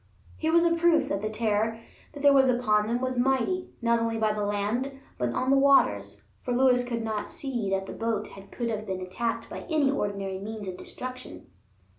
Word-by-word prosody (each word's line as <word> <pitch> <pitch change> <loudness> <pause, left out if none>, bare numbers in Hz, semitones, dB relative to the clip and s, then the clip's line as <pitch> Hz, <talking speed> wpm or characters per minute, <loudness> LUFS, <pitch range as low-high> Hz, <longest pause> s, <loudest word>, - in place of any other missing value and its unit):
Here 320 0 -1
was 340 +1 +5
a 335 - +4
proof 335 -2 +3
that 195 - -1
the 215 - -2
terror 220 0 0 0.3
that 285 -1 +4
was 265 -1 +5
upon 215 -4 +2
them 240 +2 -1
was 255 -1 -1
mighty 270 +9 +1
not 235 0 +3
only 230 0 -1
on 215 -1 +1
the 210 - -1
land 215 +7 -1 0.2
but 125 -1 0
on 255 - 0
the 275 - +5
waters; 275 0 +3 0.2
for 245 - -2
Lewis 250 -1 +4
could 235 -2 -3
not 215 -2 -3
see 245 -8 -3
that 195 0 0
the - - -7
boat 225 -2 -2 0.2
could 235 -1 -3
have 215 0 -4
been 190 -1 -3
attacked 210 +6 -3
by - - -7
any 300 -4 +3
ordinary 200 -6 -2
means 210 0 -6
of 185 - -4
destruction. 255 - -8
235 Hz, 200 wpm, -27 LUFS, 210-265 Hz, 0.3 s, was